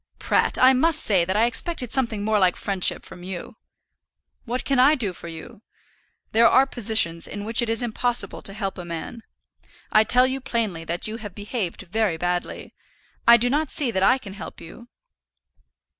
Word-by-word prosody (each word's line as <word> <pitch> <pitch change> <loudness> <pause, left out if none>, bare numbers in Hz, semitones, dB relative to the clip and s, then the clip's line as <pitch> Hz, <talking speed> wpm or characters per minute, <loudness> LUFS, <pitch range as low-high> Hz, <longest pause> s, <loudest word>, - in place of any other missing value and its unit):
"Pratt, - - 0
I 260 +1 +5
must 315 +4 +2
say 190 -5 +3
that 190 +3 -2
I 225 - +4
expected 250 +1 0
something 230 -6 -1
more 215 -1 +1
like 185 -2 +2
friendship 195 -3 +1
from 175 - -12
you." 190 +5 -8 0.9
"What 245 +1 -4
can 275 -2 +1
I 280 +5 +5
do 210 -9 -3
for 170 - -11
you? 165 +4 -11 0.7
There 230 +1 +5
are 265 +3 +4
positions 215 -10 +2
in 205 0 -7
which 225 +2 +1
it 235 - -2
is 225 +2 -1
impossible 235 -3 -2
to 195 - 0
help 195 -2 -5
a - - -6
man. 170 +7 -7 0.7
I 215 - +5
tell 250 +4 +4
you 265 +1 -3
plainly 225 -10 -3
that 170 +5 -2
you 220 +1 -6
have 205 -5 -9
behaved 205 -3 -5
very 205 -2 -1
badly. 175 +1 -4 0.5
I 235 0 +8
do 240 +2 0
not 295 +3 -1
see 270 -5 0
that 190 -3 -2
I 225 +7 +4
can 205 -7 -11
help 200 - -10
you." 235 +9 -13
220 Hz, 190 wpm, -23 LUFS, 190-245 Hz, 0.9 s, I